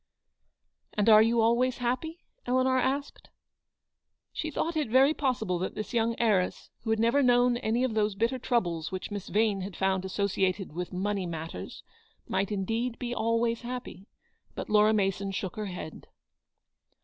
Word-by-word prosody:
"And 210 +1 +1
are 215 -1 +9
you 230 +1 +3
always 240 +3 +2
happy?" 260 +8 -3 0.2
Eleanor 260 +1 +2
asked. 275 +3 -2 1.0
She 315 - -3
thought 325 +2 -2
it 300 -6 0
very 265 +5 +5
possible 240 - -1
that 185 - -3
this 215 +4 -5
young 230 0 +1
heiress, 205 -6 +1
who 225 - -5
had 220 - +2
never 235 +5 +3
known 245 -1 +4
any 240 +1 0
of 255 -3 0
those 210 -2 +1
bitter 230 +5 0
troubles 175 -11 -1
which 185 +2 -5
Miss 205 -2 -5
Yane 210 -2 +1
had 190 0 -6
found 190 -1 +1
asso 190 +1 -1
ciated 190 -1 -1
with 175 +2 -4
"money 195 0 -2
matters," 160 - -7 0.4
might 190 +2 -1
indeed 225 +4 -2
be 245 -1 -4
always 230 0 0
happy. 240 -6 -7 0.5
But - - -5
Laura 210 0 +5
Mason 195 -2 0
shook 190 -1 -4
her 215 -1 -4
head. 180 -4 -8
220 Hz, 160 wpm, -28 LUFS, 195-245 Hz, 1.0 s, are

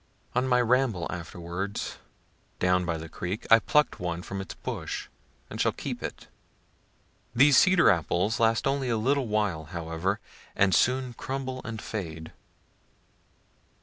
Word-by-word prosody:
On 125 +1 +1
my 125 -1 +4
ramble 120 -7 +2
afterward 90 +3 -5 0.8
down 90 0 +2
by 85 -1 -1
the 80 +1 -7
creek 90 +5 -5
I 115 - +9
pluck'd 150 +5 +2
one 85 -1 -3
from 95 0 -5
its 95 - -8
bush, - - -5 0.4
and - - -4
shall - - +3
keep - - -5
it. - - -6 1.1
These 140 +3 +6
cedar 190 - +6
apples 90 +6 0
last 115 0 +3
only 135 -2 0
a 115 - +1
little 130 +3 +1
while 105 -7 0
however, 85 +5 -2 0.4
and 95 -1 +3
soon 125 0 +2
crumble 130 +1 -4
and 115 -2 -5
fade. 80 -7 -6
105 Hz, 140 wpm, -27 LUFS, 85-125 Hz, 1.1 s, I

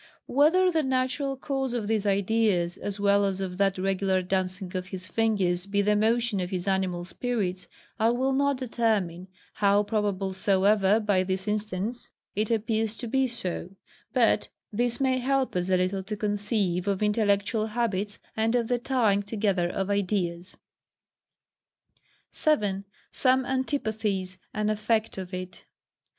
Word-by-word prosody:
Whether 345 +7 +4
the 320 -2 +2
natural 265 0 -1
cause 270 -2 -2
of 230 -3 -2
these 215 -2 0
ideas, 200 -3 +2
as 205 0 -5
well 200 0 +4
as 195 -1 0
of 185 -1 -4
that 195 -1 +2
regular 190 0 +1
dancing 185 0 -2
of 180 0 -3
his 185 -1 -6
fingers 190 -3 +1
be 200 0 +1
the 210 +1 +3
motion 225 0 +2
of 180 -1 -2
his 185 0 -3
animal 185 -2 0
spirits, 190 -3 -2 0.3
I 220 +1 +4
will 260 +3 +1
not 280 0 +2
determine, 215 -8 -1 0.3
how 205 0 +3
probable 205 -3 -1
soever, 195 +2 +3
by 205 -4 +2
this 190 +1 -2
instance, 210 +2 -3 0.2
it 215 +1 0
appears 225 -1 0
to 235 - -5
be 265 +3 +2
so: 190 -5 -5 0.4
but - - +3 0.3
this 240 +2 0
may 260 -1 +2
help 265 -1 0
us 180 +1 -1
a 185 - +4
little 185 +2 0
to 210 +1 -4
conceive 205 -3 0
of 200 0 0
intellectual 210 +1 +1
habits, 210 -3 -1 0.2
and 225 +2 +1
of 235 -2 0
the 245 -1 +1
tying 230 -6 +2
together 200 -4 0
of 195 +2 -2
ideas. 185 -3 -1 1.7
7. 205 -10 +1 0.3
Some 260 0 +3
Antipathies 220 -8 -2
an 215 0 0
Effect 215 0 0
of 185 -1 -7
it. 185 -1 -7
205 Hz, 150 wpm, -27 LUFS, 190-230 Hz, 1.7 s, Whether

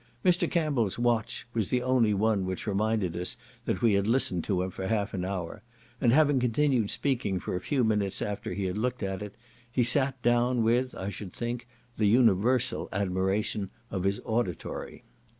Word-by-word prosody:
Mr. 180 -1 +3
Campbell's 145 - 0
watch 120 -2 0
was 110 -4 -1
the 125 -1 +1
only 125 -4 +3
one 105 0 +1
which 95 0 -4
reminded 105 -3 0
us 90 +8 -1 0.3
that - - -2
we 115 -3 +5
had 100 +1 +2
listened 110 -8 +2
to 90 -3 0
him 95 - -4
for 95 +1 -5
half 105 -1 -1
an 90 -3 -2
hour; 95 +1 -4 0.4
and 120 - +4
having 145 0 +4
continued 125 -2 +2
speaking 115 -9 0
for 90 - -4
a 90 - -3
few 130 +5 0
minutes 105 -3 +1
after 105 -1 -3
he 100 - -2
had 95 +3 -2
looked 125 0 -2
at 95 0 -3
it, 105 -1 -7 0.4
he 125 +1 +2
sat 130 +2 +3
down 120 0 +3
with, 120 +3 +1
I 95 - -4
should 100 -1 -7
think, 120 0 -4 0.3
the 105 - +3
universal 115 +2 +3
admiration 95 +1 -1 0.2
of 95 -2 -2
his 100 +1 0
auditory. 110 -7 -3
110 Hz, 185 wpm, -28 LUFS, 95-125 Hz, 0.4 s, we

